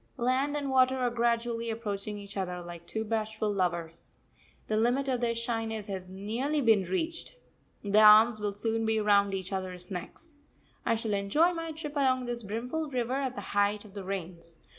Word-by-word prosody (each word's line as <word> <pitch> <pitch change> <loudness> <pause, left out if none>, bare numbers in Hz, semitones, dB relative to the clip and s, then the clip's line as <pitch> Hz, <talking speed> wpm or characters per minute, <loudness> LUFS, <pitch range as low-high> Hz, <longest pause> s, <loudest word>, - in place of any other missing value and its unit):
Land 265 +4 +1
and 280 -2 -2
water 260 0 +4
are 250 -2 0
gradually 235 0 0
approaching 210 -2 -4
each 200 0 -9
other 180 -2 -3
like 175 -1 -9
two 220 - -2
bashful 220 -1 -1
lovers. 170 -3 -3 0.5
The 215 - 0
limit 245 +5 +2
of 255 -2 0
their 235 -1 +1
shyness 225 -2 -2
has 190 -3 -6
nearly 225 +10 -2
been 220 -7 +4
reached 320 - -2 0.5
their 205 +1 +4
arms 215 +1 +7
will 210 -1 -1
soon 225 +2 -1
be 220 0 +1
round 200 -2 +3
each 190 0 -5
other's 185 -1 -3
necks. 195 - -7 0.5
I 230 - +3
shall 220 -1 -2
enjoy 205 - +3
my 330 -1 -4
trip 305 -1 -7
along 260 -3 +2
this 240 -1 -3
brimful 245 +9 -3
river 250 -2 -1
at 265 -1 -1
the - - -5
height 205 +1 +1
of 200 - -14
the 200 -2 -6
rains. 170 -3 -6
220 Hz, 185 wpm, -29 LUFS, 200-250 Hz, 0.5 s, arms